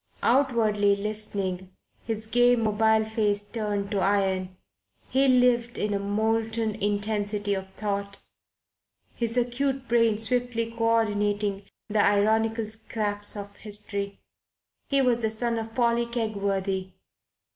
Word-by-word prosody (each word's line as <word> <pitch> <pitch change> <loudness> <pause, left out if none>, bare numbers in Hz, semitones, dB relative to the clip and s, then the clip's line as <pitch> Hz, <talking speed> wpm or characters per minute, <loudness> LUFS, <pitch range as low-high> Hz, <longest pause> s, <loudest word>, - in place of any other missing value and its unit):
Outwardly 225 -6 +3
listening, 200 -3 -3 0.3
his 220 -1 -4
gay, 245 +2 +4
mobile 220 -1 +2
face 210 -2 0
turned 205 -2 -3
to 200 - 0
iron, 190 -2 0 0.5
he 270 +1 +3
lived 245 -2 +3
in 210 0 -1
a 200 - 0
molten 220 +2 0
intensity 205 0 -1
of 190 -1 -4
thought, 200 -1 -3 1.0
his 235 0 -2
acute 260 +2 0
brain 230 -2 +3
swiftly 230 0 0
coordinating 210 -3 0 0.2
the 210 -1 +2
ironical 220 +2 +2
scraps 210 -1 -3
of 200 0 -8
history. 200 -1 -3 0.7
He 275 -1 +3
was 240 -2 +2
the 220 - +1
son 230 +1 -1
of 225 0 -7
Polly 235 -1 +2
Kegworthy. 200 -5 -2
215 Hz, 115 wpm, -26 LUFS, 205-230 Hz, 1.0 s, gay